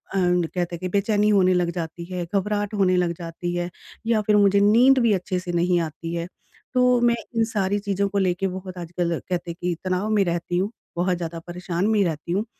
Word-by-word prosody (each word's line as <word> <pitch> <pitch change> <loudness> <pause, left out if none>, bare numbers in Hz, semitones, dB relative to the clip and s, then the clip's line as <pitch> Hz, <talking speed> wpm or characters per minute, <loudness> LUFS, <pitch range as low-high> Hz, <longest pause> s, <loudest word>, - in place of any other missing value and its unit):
And 180 -2 +2
कहते 175 0 -3
हैं - - -9
कि 185 - -3
बेचैनी 205 +2 +2
होने 185 -3 +4
लग 175 -1 +1
जाती 170 0 -5
है, 180 -1 -4
घबराहट 205 +1 0
होने 190 -3 +3
लग 175 -1 +1
जाती 175 +1 -5
है 175 0 -2 0.4
या 225 -2 +3
फिर 210 0 +2
मुझे 200 0 +5
नींद 240 +6 +5
भी 230 -3 +3
अच्छे 185 -1 -1
से 180 -1 -5
नहीं 175 +1 +2
आती 165 +1 -5
है। 170 +1 -3 0.5
तो 250 -1 +4
मैं 235 -1 +4 0.2
इन 225 - +3
सारी 205 -3 0
चीज़ों 200 -1 -1
को 200 - -2
लेके 190 0 +1
बहुत 185 0 -7
आजकल 170 -1 -2
कहते 175 -1 -2
हैं - - -8
कि 175 -1 0
तनाव 185 +3 -1
में 210 -2 +3
रहती 175 0 -1
हूँ, 195 +4 0 0.2
बहुत 180 0 +1
ज़्यादा 170 -1 -5
परेशान 180 +2 -2
मी 215 -2 +3
रहती 165 -1 -3
हूँ। 205 +5 0
185 Hz, 220 wpm, -23 LUFS, 175-205 Hz, 0.5 s, मुझे